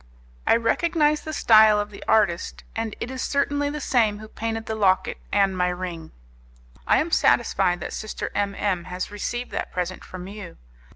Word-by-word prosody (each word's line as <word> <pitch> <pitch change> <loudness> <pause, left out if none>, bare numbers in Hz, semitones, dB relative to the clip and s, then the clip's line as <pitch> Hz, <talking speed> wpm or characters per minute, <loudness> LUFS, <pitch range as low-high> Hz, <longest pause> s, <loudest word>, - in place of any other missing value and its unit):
I - - +6
recognized 300 +6 +1
the 310 - -4
style 220 -7 +6
of 205 0 -3
the 200 - -10
artist, 195 -6 +1
and 225 -1 -3
it 245 - -4
is 260 -1 -5
certainly 285 0 0
the 300 +1 -4
same 225 -7 +2
who 215 +1 -10
painted 225 0 -4
the 220 - -3
locket 195 -4 +1
and 195 -1 +2
my 180 0 +1
ring. 180 -3 -5 0.8
I - - +5
am - - 0
satisfied 175 0 +2
that - - -5
Sister 215 - -5
M 200 -1 -1
M 185 -5 -1
has 180 +2 -5
received 240 +4 -4
that - - -4
present 180 0 -3
from 185 0 -9
you. 200 -3 -9
210 Hz, 180 wpm, -24 LUFS, 185-230 Hz, 0.8 s, I